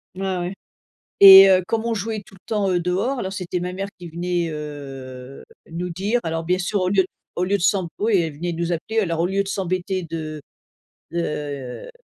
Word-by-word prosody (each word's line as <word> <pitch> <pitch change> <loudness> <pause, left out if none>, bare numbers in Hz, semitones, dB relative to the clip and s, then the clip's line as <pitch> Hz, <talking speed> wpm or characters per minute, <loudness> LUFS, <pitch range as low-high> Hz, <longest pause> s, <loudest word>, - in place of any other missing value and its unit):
Ouais, 190 0 -2
ouais 175 +2 -3 0.7
et 195 0 +11
heu, 185 -1 +4
comme 225 +2 -1
on 230 0 0
jouait 220 0 -3
tout - - -18
le - - -18
temps, 210 -3 0
heu, 180 - +2
dehors 190 +10 -1
alors, 190 -4 -3
c'était 180 -2 -3
ma 180 +1 -4
mère 195 +2 -4
qui 175 -1 -9
venait, 175 0 -2
heu, 135 -4 -8 0.3
nous 175 +2 -4
dire 200 +8 0
alors, 165 0 -3
bien 180 +2 +1
sûr, 195 +3 -1
au 185 - +1
lieu 190 -1 +3 0.3
au 175 - -2
lieu 195 +2 +1
de 195 - -6
s'emb 190 -2 +2
oui, 210 -1 +2
elle 165 -3 -1
venait 170 +4 -3
nous 170 +1 -2
appeler 220 +7 -1
alors 170 -5 -1
au 170 - +2
lieu 195 +2 0
de 200 - -8
s'embêter 185 -1 -2
de 155 -2 -5 0.7
de, 170 - -2 0.7
heu, - - -11
180 Hz, 215 wpm, -22 LUFS, 170-195 Hz, 0.7 s, et